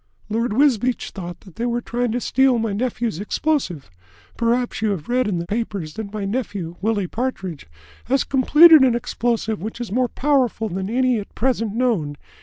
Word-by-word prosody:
"Lord 230 +2 0
Wisbeach 255 -2 +2
thought 175 -2 -7
that 190 -2 -16
they 235 - -1
were 240 0 0
trying 240 0 -2
to 245 - 0
steal 265 0 +3
my 225 -2 -1
nephew's 235 -3 -2
explosive. 205 - -2 0.4
Perhaps 240 0 0
you 220 - +1
have 185 -7 -3
read 250 -1 +2
in 195 -4 -1
the 170 - -3
papers 200 -6 -3
that 210 +1 -6
my 210 -2 -4
nephew, 200 -6 -3
Willie 210 -2 0
Partridge, 190 - -4 0.4
has 270 +3 +2
completed 300 +4 +7
an 255 -3 +4
explosive 235 -3 -1
which 220 +4 -6
is 240 -5 -5
more 250 +2 +1
powerful 255 -6 +1
than 190 +2 -3
any 250 0 +2
at 200 - -10
present 230 -4 0
known. 215 -13 0
230 Hz, 180 wpm, -21 LUFS, 200-250 Hz, 0.4 s, completed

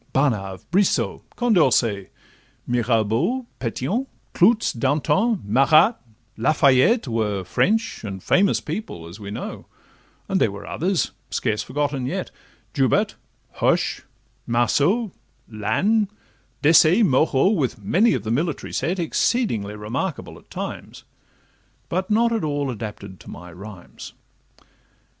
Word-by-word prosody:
Barnave, 100 -9 0
Brissot, 195 +2 +1
Condorcet, 130 - +2 0.6
Mirabeau, 120 - 0
Petion, 135 - -2 0.3
Clootz, 215 +5 +3
Danton, 150 - +1
Marat, 140 - +5 0.4
La 115 +7 +2
Fayette, 140 - +4
Were 105 -4 -1
French, 225 - 0
and 95 -3 -6
famous 200 +2 +3
people, 150 - -6
as 85 +5 -11
we 100 -1 -8
know: 105 - -7 0.6
And - - 0
there - - +4
were 100 +1 -9
others, 180 - -1 0.2
scarce 110 -3 -1
forgotten 140 +1 -2
yet, - - -4 0.4
Joubert, - - +2 0.4
Hoche, - - +1 0.5
Marceau, 145 - +1 0.4
Lannes, 200 - +1 0.6
Desaix, 165 +7 +6
Moreau, 135 +2 +3
With 155 - 0
many 190 - +3
of 120 - -4
the 110 - -3
military 150 +5 -2
set, 170 +8 -1
Exceedingly 160 - 0
remarkable 120 - -4
at - - -26
times, - - -7 0.9
But 185 +2 -2
not 230 +2 +3
at 225 -5 -1
all 145 -3 -1
adapted 105 -4 -8
to - - -13
my 90 -1 -10
rhymes. 95 0 -11
135 Hz, 115 wpm, -22 LUFS, -, 0.9 s, Desaix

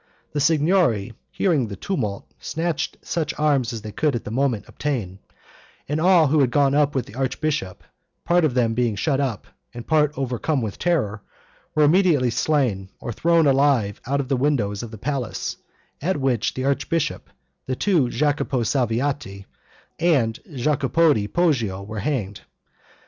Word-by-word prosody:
The 150 - -2
Signory 150 - +2 0.2
hearing 155 - +1
the 100 - -6
tumult, 105 - -3
snatched 160 -1 -2
such 160 -2 -2
arms 140 -5 +2
as 115 -3 -6
they 105 - -6
could 150 +3 0
at 120 - -3
the - - -7
moment 125 -3 0
obtain, 110 -11 -3 0.7
and 150 +2 -1
all 175 -2 +5
who 150 +2 +2
had 135 -3 +4
gone 140 +2 +3
up 145 0 +2
with 130 - 0
the - - -14
archbishop, 135 - -2 0.4
part 175 0 +3
of 145 -5 +1
them 115 -3 +2
being 120 -2 0
shut 135 +6 0
up, 130 -7 -2 0.3
and 120 0 -7
part 150 -2 +3
overcome 135 +3 -1
with 110 -5 -4
terror, 120 - 0 0.5
were 155 - +4
immediately 150 -6 +4
slain 120 -7 0
or 120 - -5
thrown 165 +5 +3
alive 135 -7 +2
out 140 +2 0
of 135 - -2
the 135 - +1
windows 120 -8 0
of 120 - -6
the 110 - -9
palace, 130 +1 -3 0.4
at 180 +4 0
which 130 -4 0
the 130 - -2
archbishop, 140 +3 -1 0.4
the 130 - -1
two 165 -7 +2
Jacopi 140 -2 0
Salviati, 120 -4 -1 0.5
and 135 -10 +2
Jacopodi 140 -2 +2
Poggio 120 - 0
were 105 +1 -6
hanged. 105 -4 -2
135 Hz, 160 wpm, -23 LUFS, 115-150 Hz, 0.7 s, all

